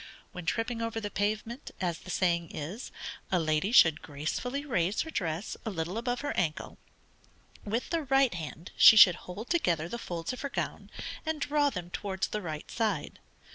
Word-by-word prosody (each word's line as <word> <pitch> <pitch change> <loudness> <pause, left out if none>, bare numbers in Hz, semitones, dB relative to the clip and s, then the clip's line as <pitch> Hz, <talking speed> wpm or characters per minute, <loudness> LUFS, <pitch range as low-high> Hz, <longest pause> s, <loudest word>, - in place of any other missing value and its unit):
When 180 -2 -8
tripping 230 0 -1
over 230 0 -2
the 205 -2 -5
pavement, 215 +6 -2
(as 175 -3 -1
the - - -13
saying 170 -3 +1
is) 175 - -6 0.4
a 185 - +4
lady 155 +4 +1
should 160 - +6
gracefully 205 - -3
raise 195 - +1
her 320 - -5
dress 170 - -2
a - - -2
little 170 -1 -3
above 245 +2 -1
her 290 - -2
ancle. 160 -3 -2 0.9
With 225 +8 -2
the 335 -1 +1
right 270 -2 +4
hand 165 +1 -7
she 220 - +9
should 185 -4 +10 0.2
hold 205 +6 -6
together 170 - +1
the 235 +7 -5
folds 170 0 -4
of 255 - -7
her 280 - -3
gown, - - -4 0.3
and 315 -1 -2
draw 290 0 +2
them 175 -8 -6
towards 190 -1 -2
the 210 - -3
right 155 -4 -6
side. 225 -2 -1
205 Hz, 180 wpm, -30 LUFS, 170-245 Hz, 0.9 s, should